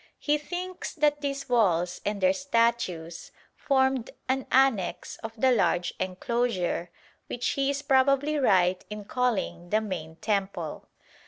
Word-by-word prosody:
He 295 Hz, 0 st, +1 dB
thinks 360 Hz, +4 st, -5 dB
that 295 Hz, -2 st, +2 dB
these 280 Hz, -1 st, -3 dB
walls 180 Hz, -8 st, +2 dB
and 205 Hz, 0 st, -2 dB
their 185 Hz, 0 st, +4 dB
statues 230 Hz, -10 st, -1 dB, 0.3 s
formed 265 Hz, -3 st, +1 dB, 0.2 s
an 260 Hz, 0 st, -1 dB
annexe 260 Hz, -8 st, +2 dB
of 225 Hz, 0 st, -8 dB
the 260 Hz, +2 st, +4 dB
large 180 Hz, -6 st, +1 dB
enclosure 185 Hz, -2 st, -1 dB, 0.4 s
which 245 Hz, -, -2 dB
he 275 Hz, 0 st, 0 dB
is 280 Hz, +1 st, -2 dB
probably 275 Hz, +3 st, +3 dB
right 185 Hz, -7 st, +3 dB
in 210 Hz, -1 st, -7 dB
calling 200 Hz, -8 st, -1 dB
the 215 Hz, -, +3 dB
main 175 Hz, -7 st, -5 dB
temple. 190 Hz, -5 st, -3 dB
230 Hz, 135 wpm, -27 LUFS, 185-270 Hz, 0.4 s, their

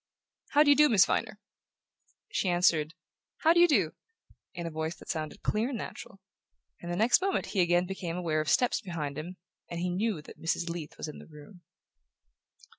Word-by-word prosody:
"How 295 Hz, +1 st, +7 dB
do 290 Hz, -, +5 dB
you -, -, +7 dB
do, 300 Hz, 0 st, +6 dB
Miss 195 Hz, -4 st, +6 dB
Viner?" 220 Hz, -1 st, -1 dB, 0.9 s
She 210 Hz, -, 0 dB
answered: 170 Hz, -2 st, +2 dB, 0.5 s
"How 325 Hz, +1 st, +5 dB
do 345 Hz, -, +3 dB
you 350 Hz, -, +7 dB
do?" 200 Hz, -, +2 dB, 0.6 s
in 170 Hz, -, -5 dB
a 165 Hz, -, -4 dB
voice 160 Hz, +2 st, -3 dB
that -, -, -15 dB
sounded 155 Hz, -3 st, -4 dB
clear 220 Hz, +4 st, 0 dB
and 260 Hz, -, -3 dB
natural; 195 Hz, -, -8 dB, 0.6 s
and 175 Hz, -, -5 dB
the -, -, -1 dB
next 225 Hz, -, +4 dB
moment 390 Hz, +1 st, 0 dB
he 195 Hz, -, +3 dB
again 175 Hz, +1 st, +3 dB
became 180 Hz, -2 st, -5 dB
aware 160 Hz, -3 st, 0 dB
of 155 Hz, -, -3 dB
steps 245 Hz, -1 st, +2 dB
behind 160 Hz, -8 st, -4 dB
him, 170 Hz, +5 st, -7 dB, 0.3 s
and 170 Hz, -, -5 dB
knew 180 Hz, 0 st, -1 dB
that -, -, -14 dB
Mrs. 170 Hz, +1 st, -1 dB
Leath 165 Hz, -3 st, -7 dB
was -, -, -5 dB
in 150 Hz, -, -8 dB
the -, -, -13 dB
room. 155 Hz, +4 st, -14 dB
175 Hz, 190 wpm, -29 LUFS, 160-220 Hz, 0.9 s, How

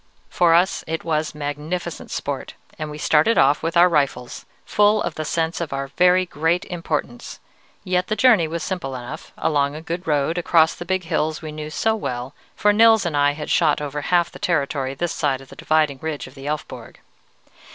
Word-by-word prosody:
"For 170 Hz, -2 st, +4 dB
us, 180 Hz, +4 st, +2 dB
it 160 Hz, +1 st, -3 dB
was 155 Hz, -2 st, -1 dB
magnificent 150 Hz, +4 st, -5 dB
sport, 140 Hz, -2 st, -4 dB, 0.2 s
and 155 Hz, 0 st, -4 dB
we 150 Hz, -, -7 dB
started 155 Hz, +8 st, +3 dB
off 145 Hz, -, +4 dB
with 165 Hz, +1 st, -1 dB
our 175 Hz, +1 st, +7 dB
rifles, 140 Hz, -7 st, -1 dB, 0.2 s
full 210 Hz, +1 st, +3 dB
of -, -, -3 dB
the 155 Hz, -, -4 dB
sense 165 Hz, +2 st, -1 dB
of 165 Hz, -, -4 dB
our 135 Hz, 0 st, -3 dB
very 180 Hz, +4 st, +3 dB
great 165 Hz, +1 st, 0 dB
importance: 155 Hz, -8 st, -4 dB, 0.4 s
yet 180 Hz, 0 st, 0 dB
the 215 Hz, -, -1 dB
journey 215 Hz, -7 st, +4 dB
was 165 Hz, 0 st, -4 dB
simple 155 Hz, -9 st, -4 dB
enough, 125 Hz, +5 st, -8 dB
along 145 Hz, -2 st, 0 dB
a -, -, -6 dB
good 170 Hz, +2 st, -5 dB
road, 150 Hz, +3 st, +1 dB
across 165 Hz, -2 st, +3 dB
the 175 Hz, -, -8 dB
big 185 Hz, +1 st, -1 dB
hills 160 Hz, -1 st, -2 dB
we 155 Hz, -, -5 dB
knew 150 Hz, 0 st, -6 dB
so 220 Hz, +8 st, 0 dB
well, 125 Hz, -, -4 dB, 0.2 s
for 210 Hz, 0 st, +3 dB
Nils 225 Hz, -1 st, +5 dB
and 165 Hz, -3 st, -1 dB
I 145 Hz, 0 st, +3 dB
had 150 Hz, 0 st, -6 dB
shot -, -, +3 dB
over 145 Hz, 0 st, -4 dB
half 175 Hz, +3 st, +1 dB
the -, -, -12 dB
territory 140 Hz, -7 st, -1 dB
this 175 Hz, +4 st, -2 dB
side 135 Hz, -3 st, 0 dB
of 135 Hz, -, -15 dB
the -, -, -12 dB
dividing 155 Hz, -3 st, +1 dB
ridge 155 Hz, -2 st, -4 dB
of 130 Hz, -, -13 dB
the 135 Hz, 0 st, -9 dB
Elfborg. 150 Hz, 0 st, -6 dB
155 Hz, 200 wpm, -22 LUFS, 145-175 Hz, 0.4 s, our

